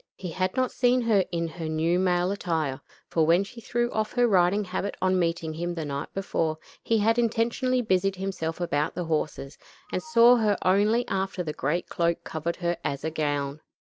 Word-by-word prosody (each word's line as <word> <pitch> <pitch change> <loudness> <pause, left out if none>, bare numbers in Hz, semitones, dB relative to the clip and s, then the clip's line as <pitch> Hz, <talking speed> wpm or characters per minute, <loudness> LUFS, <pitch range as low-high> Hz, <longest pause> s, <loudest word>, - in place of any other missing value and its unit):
He 180 -3 -6
had 185 +3 -1
not 255 -1 +1
seen 250 0 +2
her 220 -5 +3
in 170 -1 -1
her 160 0 -6
new 165 +3 +1
male 180 0 +2
attire, 160 -9 -2 0.3
for 165 - +1
when 170 +4 +4
she 230 +4 -11
threw 240 +1 -1
off 215 0 -2
her 245 -1 +3
riding 190 0 +3
habit 190 +1 -4
on 185 0 +2
meeting 165 -2 -1
him 175 +2 -3
the 160 -2 -3
night 140 -1 -4
before, 165 -5 -1 0.2
he 225 - +1
had 225 +3 +2
intentionally 240 +2 +1
busied 195 -2 +1
himself 185 -4 -4
about 150 -4 -1
the 180 0 -3
horses, 150 -3 -3 0.3
and - - -1
saw 245 -5 +6
her 210 -3 +2
only 210 +6 +3
after 190 -1 -2
the 155 -3 -4
great 150 +6 -1
cloak 170 0 0
covered 160 +2 -3
her 175 -1 -1
as 140 0 -3
a 160 - -2
gown. 145 -2 -2
180 Hz, 195 wpm, -26 LUFS, 160-210 Hz, 0.3 s, saw